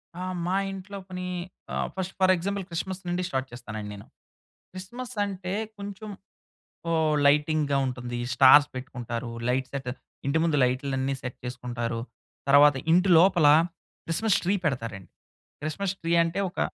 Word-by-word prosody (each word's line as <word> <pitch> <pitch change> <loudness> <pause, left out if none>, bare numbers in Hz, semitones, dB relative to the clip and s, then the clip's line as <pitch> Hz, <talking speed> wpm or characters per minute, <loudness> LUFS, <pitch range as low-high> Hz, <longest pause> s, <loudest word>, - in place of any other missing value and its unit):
ఆ! 180 - -6 0.2
మా 185 +2 0 0.2
ఇంట్లో 195 +1 -7
పని 180 0 -5 0.5
ఆహ్, - - -1
ఫస్ట్ 190 0 -3
ఫర్ 185 0 +5
ఎగ్జాంపుల్ 200 +3 -2
క్రిస్మస్ 185 +3 -4
నుండి 175 +1 -1
స్టార్ట్ 130 -2 -2
చేస్తానండి 110 -3 -7
నేను. 100 - -11 0.7
క్రిస్మస్ 240 +7 -8
అంటే, 190 -1 -4 0.3
కొంచెం 200 +1 -7 0.8
ఓ - - +2 0.3
లైటింగ్‍గా 150 0 +3
ఉంటుంది, 120 -1 -4 0.2
స్టార్స్ 145 +3 +8
పెట్టుకుంటారు, 120 -2 -5 0.2
లైట్ 130 +1 0
సెట్ 135 -2 -4 0.4
ఇంటి 140 +3 +2
ముందు 160 -3 +2
లైట్లన్నీ 130 +1 0
సెట్ 125 -1 -6
చేసుకుంటారు, 120 -2 -3 0.5
తర్వాత 145 0 +7 0.2
ఇంటిలోపల 175 -2 +5 0.6
క్రిస్మస్ 200 +5 +2
ట్రీ 190 +4 +2
పెడతారండి. 115 - -3 0.5
క్రిస్మస్ 180 +6 -2
ట్రీ 165 0 -1
అంటే 165 +3 -2
ఒక 185 - -17
155 Hz, 135 wpm, -27 LUFS, 125-185 Hz, 0.8 s, స్టార్స్